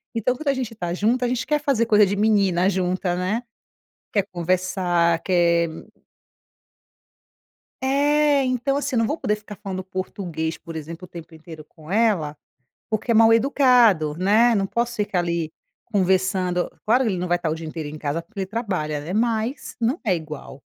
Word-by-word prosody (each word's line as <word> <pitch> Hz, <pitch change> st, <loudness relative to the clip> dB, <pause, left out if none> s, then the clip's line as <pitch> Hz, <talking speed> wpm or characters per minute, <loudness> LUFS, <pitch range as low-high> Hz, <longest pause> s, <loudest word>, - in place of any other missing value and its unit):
então 230 Hz, +2 st, +1 dB
quando 300 Hz, +4 st, -8 dB
a -, -, +3 dB
gente 255 Hz, -4 st, -4 dB
está 175 Hz, -6 st, -4 dB
junto 230 Hz, +7 st, +1 dB
a -, -, +1 dB
gente 245 Hz, -1 st, -1 dB
quer 300 Hz, 0 st, +2 dB
fazer 275 Hz, -6 st, +1 dB
coisa 210 Hz, -2 st, +5 dB
de 200 Hz, +1 st, -1 dB
menina 200 Hz, -4 st, +3 dB
junta, 185 Hz, -1 st, -1 dB
né. 185 Hz, +7 st, -1 dB, 0.7 s
Quer 200 Hz, -3 st, +2 dB
conversar, 175 Hz, -1 st, +1 dB
quer 170 Hz, -2 st, +2 dB, 2.1 s
É, 290 Hz, +1 st, +3 dB
então 255 Hz, +2 st, 0 dB
assim, 285 Hz, -2 st, -2 dB
eu -, -, +3 dB
não 225 Hz, -, +2 dB
vou 300 Hz, -, -2 dB
poder 210 Hz, -8 st, 0 dB
ficar 210 Hz, 0 st, -11 dB
falando 190 Hz, -2 st, -6 dB
português, 180 Hz, -4 st, -4 dB
por 165 Hz, -, -10 dB
exemplo, 165 Hz, +3 st, -7 dB
o -, -, -17 dB
tempo 170 Hz, -1 st, -11 dB
inteiro 160 Hz, -1 st, -11 dB
com 155 Hz, 0 st, -16 dB
ela, 195 Hz, -9 st, +1 dB, 0.5 s
porque 220 Hz, +2 st, -1 dB
é -, -, +4 dB
mal-educado, 225 Hz, -, +4 dB
né, 215 Hz, +6 st, +4 dB
não 195 Hz, -3 st, +1 dB
posso 235 Hz, +3 st, -1 dB
ficar 205 Hz, -3 st, 0 dB
ali 170 Hz, -2 st, -1 dB, 0.4 s
conversando. 185 Hz, -3 st, +1 dB, 0.2 s
Claro 245 Hz, +4 st, +3 dB
que 225 Hz, -, +1 dB
ele 185 Hz, -, -2 dB
não 180 Hz, +1 st, -2 dB
vai 175 Hz, -, +3 dB
estar 165 Hz, -, -2 dB
o 155 Hz, -, -1 dB
dia 165 Hz, 0 st, -8 dB
inteiro 155 Hz, -1 st, -5 dB
em 150 Hz, +1 st, -7 dB
casa, 150 Hz, +2 st, -2 dB
porque 200 Hz, +5 st, -11 dB
ele 190 Hz, -, -1 dB
trabalha, 185 Hz, -9 st, -3 dB
né, 155 Hz, +5 st, -6 dB
mas 230 Hz, +4 st, -1 dB
não 240 Hz, +6 st, +1 dB
é 210 Hz, -6 st, +2 dB
igual. 155 Hz, -4 st, -7 dB
190 Hz, 180 wpm, -23 LUFS, 170-230 Hz, 2.1 s, coisa